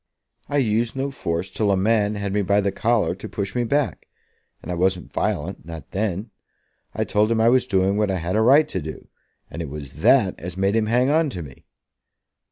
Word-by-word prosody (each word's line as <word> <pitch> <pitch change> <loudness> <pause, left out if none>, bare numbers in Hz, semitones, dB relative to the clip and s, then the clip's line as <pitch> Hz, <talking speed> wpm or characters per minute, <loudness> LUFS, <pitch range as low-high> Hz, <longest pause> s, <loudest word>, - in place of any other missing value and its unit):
"I 145 - 0
used 115 -2 +1
no 135 +1 -2
force 90 -6 -3
till 105 -2 0
a 100 - +3
man 105 +1 +2
had 100 -1 -3
me 105 - +2
by 100 +1 +2
the 100 -1 0
collar 110 -7 +1
to 95 - -9
push 100 -1 -4
me 120 - 0
back; 140 +1 -1 0.6
and - - -5
I - - -1
wasn't 90 +1 -1
violent, 90 +6 -2
not 80 -2 -9
then. 105 +1 -2 0.6
I - - 0
told 105 +1 +1
him 115 -1 +1
I 115 +1 +5
was 125 0 +3
doing 95 0 +2
what 105 -1 +1
I 95 - 0
had 90 +2 -2
a 110 - +3
right 140 +7 +6
to 95 - -3
do, 80 +1 -8 0.4
and 85 - -5
it 80 - -5
was 70 -2 -8
that - - +4
as 90 +2 -7
made 95 +2 +1
him 110 -1 +1
hang 125 +4 +2
on 160 0 +2
to 90 -9 -6
me." 65 -4 -14
100 Hz, 220 wpm, -23 LUFS, 90-115 Hz, 0.6 s, right